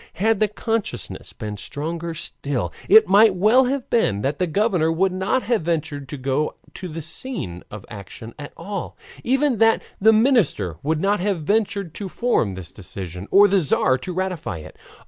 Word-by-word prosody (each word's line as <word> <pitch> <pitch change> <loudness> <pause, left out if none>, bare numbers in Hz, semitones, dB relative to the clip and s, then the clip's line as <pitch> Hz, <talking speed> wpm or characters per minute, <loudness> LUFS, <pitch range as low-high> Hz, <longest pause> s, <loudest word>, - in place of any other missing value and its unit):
Had 215 +4 +1
that 210 -1 0
consciousness 225 -2 -3
been 105 -1 -6
stronger 165 +7 -5
still, 135 - -4 0.2
it 220 +2 +8
might 200 +1 +6
well 220 +8 +5
have 265 0 -2
been 105 - +2
that 140 +5 -2
the 180 - +1
governor 180 -3 +1
would 185 +4 +1
not 190 +8 0
have 235 -4 +1
ventured 155 -4 -3
to 145 - -5
go 135 +3 -1 0.2
to 185 - -7
the 165 -1 -6
scene 155 - -5
of 105 -2 -9
action 110 +2 -10
at 145 - -8
all; 200 -3 -6 0.3
even 265 -1 +1
that 225 0 +4 0.2
the 220 +3 +6
minister 220 - +2
would 155 +2 0
not 205 +1 +2
have 185 -3 -1
ventured 200 -1 0
to 200 -2 -6
form 175 - 0
this 95 -3 -8
decision 90 -1 -8
or 205 +1 +7
the 195 0 +3
Tzar 135 -4 +2
to 180 - -5
ratify 180 - -3
it. 80 0 -11
175 Hz, 180 wpm, -22 LUFS, 140-215 Hz, 0.3 s, it